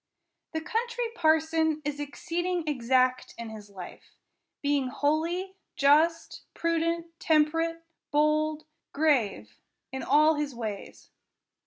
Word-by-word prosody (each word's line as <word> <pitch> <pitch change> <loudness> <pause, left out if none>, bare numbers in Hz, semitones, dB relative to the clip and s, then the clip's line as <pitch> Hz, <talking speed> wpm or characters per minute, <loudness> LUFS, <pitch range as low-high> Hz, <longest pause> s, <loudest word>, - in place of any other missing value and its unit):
The 320 - -2
Country 475 +7 -2
Parson 320 -3 +2
is 290 0 -3
exceeding 345 +4 -2
exact 255 -2 +1
in 230 -1 -6
his 210 -2 -10
life; 185 -3 -11 0.5
being 285 -2 +1
holy, 320 +7 -1 0.2
just, 310 +4 +3
prudent, 335 0 0
temperate, 330 +2 +2 0.3
bold, 305 +1 +1 0.3
grave, 220 - +1 0.3
in 265 0 -4
all 305 +1 +5
his 290 -3 -3
ways. 215 -4 -7
305 Hz, 105 wpm, -28 LUFS, 265-330 Hz, 0.5 s, all